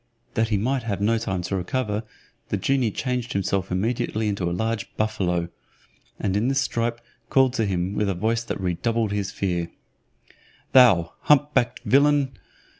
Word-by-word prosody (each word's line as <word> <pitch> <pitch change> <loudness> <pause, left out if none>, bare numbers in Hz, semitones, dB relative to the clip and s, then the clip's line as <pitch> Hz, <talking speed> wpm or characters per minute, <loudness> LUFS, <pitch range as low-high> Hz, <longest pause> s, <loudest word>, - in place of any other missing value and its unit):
That 115 0 +1
he 110 -2 +1
might 130 +6 0
have 105 -4 -3
no 115 +3 +2
time 95 -5 -2
to 100 - -2
recover, 105 +3 -1 0.5
the 105 - 0
genie 120 +5 +1
changed 125 +2 -3
himself 100 -1 -1
immediately 110 +2 -1
into 100 -4 -1
a - - -3
large 110 +5 -2
buffalo, 90 -6 0 0.7
and 95 -2 -1
in 105 +4 +1
this 135 0 +2
stripe 115 -2 -1 0.3
called 130 -2 +4
to 115 -5 0
him, 90 0 -1
with 105 -1 0
a 95 - -1
voice 115 +5 0
that - - -4
redoubled 105 +4 0
his 100 -2 -1
fear, 85 -3 -2 1.0
"Thou 105 -11 +6
hump 150 0 +3
backed 120 +1 +1
villain!" 140 0 +3
110 Hz, 165 wpm, -24 LUFS, 95-120 Hz, 1.0 s, Thou